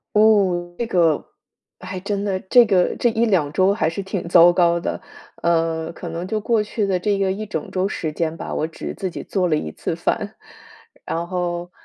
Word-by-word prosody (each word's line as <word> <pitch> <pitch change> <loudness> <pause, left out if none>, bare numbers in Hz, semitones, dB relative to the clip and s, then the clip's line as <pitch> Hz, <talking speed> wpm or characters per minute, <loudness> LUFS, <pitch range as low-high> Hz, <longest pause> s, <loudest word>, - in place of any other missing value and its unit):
哦， 190 -5 +3
这 235 - -1
个， 175 -6 +3 0.7
还 185 0 -6
真 200 +1 -3
的， 195 -2 -1
这 235 +6 +5
个 190 -4 +2
这 240 - +2
1-2 210 -10 +1
周 185 +5 +3
还 160 -6 0
是 165 +4 -4
挺 190 -2 -4
糟 175 0 +7
糕 170 -1 +3
的。 - - -4 0.4
嗯， 165 -1 +1
可 170 - -7
能 170 +2 -4
就 215 +2 -1
过 220 0 +1
去 210 0 -2
的 190 - +1
这 200 +2 0
个 190 -1 +1
1 215 +3 -4
整 210 0 -5
周 185 +1 0
时 160 -6 -3
间 160 0 -2
吧， - - -6
我 155 - 0
只 165 - -7
自 190 - -3
己 - - -7
做 185 -3 0
了 160 - +2
1 80 - -3
次 - - -4
饭。 - - -2 0.7
然 170 +1 -3
后， 175 -1 -3
185 Hz, 205 characters per minute, -21 LUFS, 170-200 Hz, 0.7 s, 糟